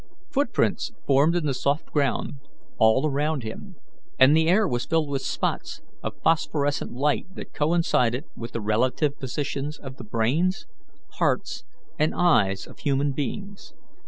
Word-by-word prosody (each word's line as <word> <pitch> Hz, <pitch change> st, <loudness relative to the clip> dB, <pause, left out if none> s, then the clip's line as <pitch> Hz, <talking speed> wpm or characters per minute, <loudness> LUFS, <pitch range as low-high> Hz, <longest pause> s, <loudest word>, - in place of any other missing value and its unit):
Footprints 285 Hz, +1 st, 0 dB
formed 145 Hz, +5 st, +4 dB
in 175 Hz, -3 st, 0 dB
the 140 Hz, -, +1 dB
soft 140 Hz, +4 st, -1 dB
ground 140 Hz, -1 st, 0 dB, 0.4 s
all 110 Hz, +6 st, +5 dB
around 150 Hz, -1 st, 0 dB
him, 110 Hz, 0 st, -8 dB, 0.4 s
and 130 Hz, +3 st, +7 dB
the 160 Hz, 0 st, +3 dB
air 195 Hz, +4 st, +4 dB
was 120 Hz, -4 st, -2 dB
filled 160 Hz, -2 st, +1 dB
with 135 Hz, -1 st, -1 dB
spots -, -, -3 dB, 0.2 s
of -, -, -5 dB
phosphorescent 145 Hz, -3 st, +1 dB
light 145 Hz, +7 st, 0 dB
that -, -, -9 dB
coincided 150 Hz, -5 st, +1 dB
with 115 Hz, 0 st, -7 dB
the 115 Hz, -, -3 dB
relative 125 Hz, +7 st, +1 dB
positions 140 Hz, +2 st, -3 dB
of 135 Hz, -2 st, -9 dB
the -, -, -8 dB
brains, 130 Hz, -, 0 dB, 0.5 s
hearts, -, -, 0 dB, 0.3 s
and 155 Hz, +1 st, +2 dB
eyes 100 Hz, -, +3 dB
of -, -, -15 dB
human 140 Hz, 0 st, +1 dB
beings. 195 Hz, -, -5 dB
140 Hz, 145 wpm, -25 LUFS, 125-160 Hz, 0.5 s, and